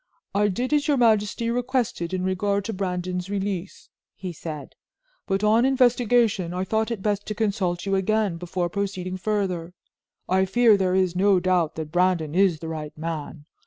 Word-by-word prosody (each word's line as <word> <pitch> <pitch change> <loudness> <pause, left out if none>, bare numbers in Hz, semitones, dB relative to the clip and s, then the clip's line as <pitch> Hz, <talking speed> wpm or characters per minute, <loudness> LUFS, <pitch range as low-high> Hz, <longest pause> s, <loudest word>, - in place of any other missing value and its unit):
"I 205 +1 +3
did 245 +8 -2
as 295 0 +2
your 290 -2 +3
majesty 230 0 +2
requested 245 -8 -1
in 185 -1 -2
regard 200 +2 0
to 225 - -3
Brandon's 180 -1 -3
release," 195 -2 -4 0.3
he 185 -2 -6
said, 155 -2 -7 0.5
"but 195 +1 0
on 220 +3 +4
investigation, 240 -8 +2
I 185 - -1
thought 220 +3 0
it 225 -5 -4
best 205 -1 -1
to 215 - -3
consult 195 -5 -1
you 195 - -1
again 195 -1 +1
before 180 +1 -2
proceeding 185 -1 -3
further. 185 -4 -2 0.5
I 190 +1 +3
fear 225 +3 +5
there 185 -2 +1
is 185 -2 +1
no 195 0 +4
doubt 180 -3 +1
that 155 -1 -5
Brandon 175 -3 +1
is 185 -2 +3
the 165 - -5
right 155 -2 -6
man. 160 -1 -5
190 Hz, 170 wpm, -24 LUFS, 180-215 Hz, 0.5 s, fear